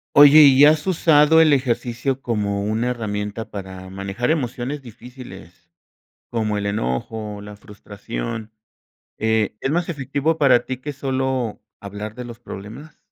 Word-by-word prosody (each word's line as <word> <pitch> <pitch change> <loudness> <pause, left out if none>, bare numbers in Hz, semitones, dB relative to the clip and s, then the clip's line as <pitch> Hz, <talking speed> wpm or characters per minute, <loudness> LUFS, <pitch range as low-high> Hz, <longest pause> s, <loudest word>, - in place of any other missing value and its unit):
Oye, 145 +1 +9
¿y 140 -1 +7
has 155 +2 +3
usado 160 -3 +5
el 155 -2 +5
ejercicio 130 0 -1
como 100 -3 -1
una 110 +3 -1
herramienta 105 -2 -4
para 95 -2 -8
manejar 100 +7 -2
emociones 135 -1 -3
difíciles? 115 -8 -13 0.6
Como 110 -3 -1
el 100 - -3
enojo, 105 - -3
la 105 0 -10
frustración, 105 - -7 0.7
eh, 110 -1 0
¿es 135 - -1
más 170 +2 0
efectivo 145 +1 -1
para 135 -5 +3
ti, 130 - -3
que 145 +3 -6
solo 130 -4 -2 0.2
hablar 105 +2 -7
de 125 +1 -7
los 120 -1 -10
problemas? 120 +9 -10
120 Hz, 135 wpm, -21 LUFS, 105-140 Hz, 0.7 s, Oye